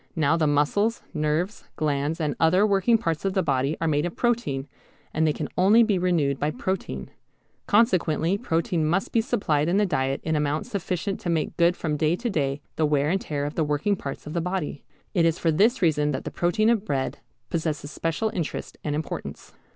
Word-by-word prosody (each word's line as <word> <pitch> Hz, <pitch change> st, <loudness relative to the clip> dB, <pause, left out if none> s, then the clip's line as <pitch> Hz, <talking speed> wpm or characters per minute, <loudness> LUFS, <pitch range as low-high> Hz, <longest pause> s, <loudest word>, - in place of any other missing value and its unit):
Now 160 Hz, -1 st, +3 dB
the 160 Hz, -2 st, +2 dB
muscles, 175 Hz, +11 st, +1 dB
nerves, 155 Hz, +6 st, -1 dB
glands 150 Hz, +1 st, -1 dB
and 150 Hz, -3 st, -1 dB
other 180 Hz, +5 st, +4 dB
working 210 Hz, +3 st, +3 dB
parts 165 Hz, -7 st, -2 dB
of 195 Hz, -1 st, 0 dB
the 190 Hz, -1 st, +1 dB
body 135 Hz, +3 st, 0 dB
are 165 Hz, -, 0 dB
made 150 Hz, +1 st, +1 dB
of 175 Hz, -, -8 dB
protein, 225 Hz, -, 0 dB, 0.5 s
and 160 Hz, 0 st, +2 dB
they -, -, +3 dB
can 150 Hz, 0 st, -4 dB
only 205 Hz, +6 st, +6 dB
be 205 Hz, -5 st, +1 dB
renewed 160 Hz, -7 st, +1 dB
with 150 Hz, +1 st, -1 dB
protein. 65 Hz, -, -3 dB, 0.6 s
Consequently 185 Hz, -6 st, +3 dB
protein 170 Hz, -5 st, 0 dB
must 175 Hz, +5 st, 0 dB
be 230 Hz, -, +3 dB
supplied 160 Hz, -, 0 dB
in 185 Hz, -, +2 dB
the 210 Hz, -, +3 dB
diet 135 Hz, -6 st, 0 dB
in 160 Hz, -, 0 dB
amount 150 Hz, 0 st, 0 dB
sufficient 195 Hz, +1 st, -3 dB
to 175 Hz, -, -4 dB
make 165 Hz, -2 st, -1 dB
good 170 Hz, +1 st, +3 dB
from 150 Hz, -2 st, -2 dB
day 155 Hz, +3 st, +2 dB
to 235 Hz, +4 st, -3 dB
day 140 Hz, -4 st, -1 dB, 0.2 s
the 155 Hz, -, +3 dB
wear 145 Hz, +1 st, +2 dB
and 195 Hz, +1 st, 0 dB
tear 145 Hz, -2 st, -3 dB
of 145 Hz, -, -4 dB
the 160 Hz, -, 0 dB
working 150 Hz, +7 st, +1 dB
parts 140 Hz, -7 st, -7 dB
of 150 Hz, -, -6 dB
the 170 Hz, -, 0 dB
body. 180 Hz, -5 st, -3 dB, 0.3 s
It 175 Hz, -5 st, +3 dB
is 165 Hz, 0 st, +2 dB
for 165 Hz, -, +1 dB
this 215 Hz, +8 st, +3 dB
reason 150 Hz, -3 st, +2 dB
that 130 Hz, -, -3 dB
the -, -, -5 dB
protein 215 Hz, +6 st, +2 dB
of 220 Hz, -4 st, +1 dB
bread 135 Hz, -8 st, -2 dB, 0.3 s
possesses 155 Hz, -3 st, -2 dB
special 165 Hz, +9 st, -1 dB
interest 170 Hz, -5 st, -4 dB
and 150 Hz, -1 st, -1 dB
importance. 155 Hz, +1 st, -6 dB
165 Hz, 205 wpm, -25 LUFS, 150-190 Hz, 0.6 s, only